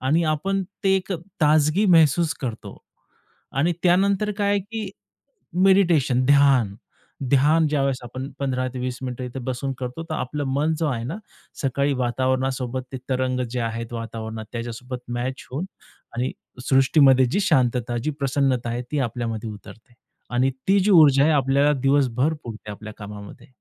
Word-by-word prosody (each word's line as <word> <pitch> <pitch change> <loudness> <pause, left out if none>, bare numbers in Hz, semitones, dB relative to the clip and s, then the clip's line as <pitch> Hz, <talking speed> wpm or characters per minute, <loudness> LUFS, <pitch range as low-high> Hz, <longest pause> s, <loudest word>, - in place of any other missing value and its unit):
आणि 155 +6 +2
आपण 195 +6 -1 0.2
ते 195 0 +4
एक 190 +1 -3
अ, - - -1 0.2
ताजगी 155 +6 +3
महसूस 160 +1 +3
करतो 120 -6 -6 0.8
आणि 165 +5 +3
त्यानंतर 195 +3 +3
काय 200 -1 +1
आहे 205 0 +2
की 215 +2 -6 0.8
मेडिटेशन, 170 -10 +4
ध्यान. 140 -7 +4 0.6
ध्यान 150 +4 +4
ज्यावेळेस 140 -3 0
आपण 130 +3 -6
15-20 130 -2 -2
मिनिटं 125 0 -4
इथे 125 +1 -6
बसून 130 +2 -3
करतो 125 +4 -5
तर - - -1
आपलं 145 +1 -3
मन 155 +3 +1
जो 165 - 0
आहे 120 -5 -2
ना 135 +10 -4 0.5
सकाळी 140 +1 +1
वातावरणासोबत 130 0 -1
ते - - -3
तरंग 130 0 0
जे 125 0 -2
आहे 115 0 -3
वातावरणात 115 -1 -6
त्याच्यासोबत 120 +2 -5 0.2
मॅच 130 +2 -4
होऊन 140 +7 -3 0.5
आणि 125 +2 -1 0.4
सृष्टीमध्ये 135 -1 +5
जी 135 +12 0
शांतता, 125 - +1
जी 135 +6 -2
प्रसन्नता 135 -3 0
आहे 120 +1 -3
ती 150 - 0
आपल्यामध्ये 115 -2 -4
उतरते 110 +3 -13 0.4
आणि 130 +2 +3 0.2
ती 195 +1 +5
जी 200 +3 +2
ऊर्जा 150 -7 +7
आहे 160 - +4
आपल्याला 140 +1 +3
दिवसभर 135 +1 +2
पुरते 110 -2 -8
आपल्या 105 +1 -9
कामामध्ये. 105 -1 -10
130 Hz, 150 wpm, -23 LUFS, 125-155 Hz, 0.8 s, ऊर्जा